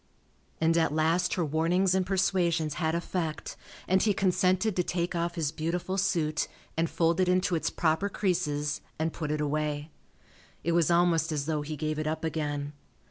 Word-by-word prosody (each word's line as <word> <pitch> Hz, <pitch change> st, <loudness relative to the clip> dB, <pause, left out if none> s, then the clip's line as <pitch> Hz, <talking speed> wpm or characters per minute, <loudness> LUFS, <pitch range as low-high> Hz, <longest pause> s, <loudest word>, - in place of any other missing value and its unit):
And 165 Hz, +1 st, +3 dB
at 160 Hz, -2 st, +2 dB
last 160 Hz, +4 st, +1 dB
her 175 Hz, -, 0 dB
warnings 170 Hz, +5 st, +2 dB
and 190 Hz, 0 st, +2 dB
persuasions 180 Hz, -4 st, +1 dB
had 160 Hz, 0 st, +1 dB
effect 170 Hz, -2 st, -3 dB, 0.3 s
and 190 Hz, +1 st, +3 dB
he 210 Hz, -3 st, +2 dB
consented 185 Hz, +2 st, +2 dB
to 180 Hz, -, +2 dB
take 175 Hz, 0 st, -2 dB
off 170 Hz, 0 st, -1 dB
his 155 Hz, -4 st, -1 dB
beautiful 170 Hz, +4 st, -2 dB
suit 165 Hz, -5 st, 0 dB, 0.3 s
and 165 Hz, 0 st, +1 dB
fold 170 Hz, +1 st, +1 dB
it 185 Hz, -1 st, +3 dB
into 185 Hz, +1 st, +2 dB
its 165 Hz, -, +1 dB
proper 160 Hz, +4 st, +1 dB
creases 150 Hz, -7 st, -1 dB, 0.2 s
and 160 Hz, +1 st, -1 dB
put 155 Hz, -3 st, -4 dB
it 150 Hz, 0 st, -1 dB
away. 150 Hz, +1 st, -2 dB, 0.7 s
It 170 Hz, -, +1 dB
was 170 Hz, -2 st, +3 dB
almost 170 Hz, -1 st, +3 dB
as 145 Hz, -2 st, -1 dB
though 155 Hz, -1 st, -1 dB
he 150 Hz, +1 st, -5 dB
gave 155 Hz, +1 st, -2 dB
it 155 Hz, -, -2 dB
up 155 Hz, +1 st, -2 dB
again. 145 Hz, -2 st, -2 dB
165 Hz, 180 wpm, -29 LUFS, 155-180 Hz, 0.7 s, And